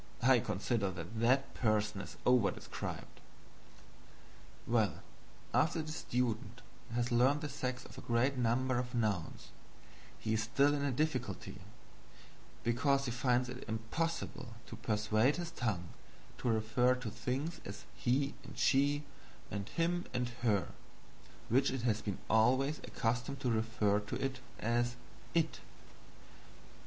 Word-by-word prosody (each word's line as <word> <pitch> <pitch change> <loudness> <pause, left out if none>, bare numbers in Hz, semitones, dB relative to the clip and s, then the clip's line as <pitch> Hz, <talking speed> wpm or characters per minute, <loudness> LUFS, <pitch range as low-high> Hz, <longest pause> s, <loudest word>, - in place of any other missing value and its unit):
I 130 0 +7
consider 105 0 0
that 90 +5 -6
that 130 +4 +3
person 105 -3 +1
is - - -9
over 125 -5 +5
described. - - -6 1.5
Well, 115 -3 +1 0.5
after 160 0 +3
the 155 - -6
student 120 -4 -2 0.3
has 120 +1 0
learned 130 +5 +4
the 150 - -3
sex 130 -2 -3
of - - -10
a - - -8
great 120 +4 +2
number 125 +1 +2
of 125 0 -4
nouns, 105 -7 -1 0.7
he 110 - -1
is 110 - +2
still 140 +6 +3
in 145 -1 0
a 140 - +2
difficulty, 150 0 -2 1.0
because 135 +4 +2
he 120 - -1
finds 125 0 +2
it 125 +1 -6
impossible 115 +2 -3
to - - -8
persuade 110 +3 +2
his 175 -1 -4
tongue 100 - -2 0.5
to 125 - 0
refer 115 +3 +3
to 125 -4 -5
things 145 +10 -3
as 100 +1 -7
"he" 130 +10 +1
and 135 0 -11
"she," 145 +2 +3 0.5
and 100 0 -3
"him" 175 +1 0
and 125 -1 0
"her," 105 -6 +2 0.8
which 130 +4 +4
it 130 -2 -3
has 110 -3 +2
been 100 -3 -3
always 130 +7 +3
accustomed 125 +4 -2
to 125 - +1
refer 110 -2 +2
to 120 +6 -2 0.3
as 120 +2 +1 0.4
"it." 165 -1 +2
120 Hz, 135 wpm, -35 LUFS, 110-135 Hz, 1.5 s, I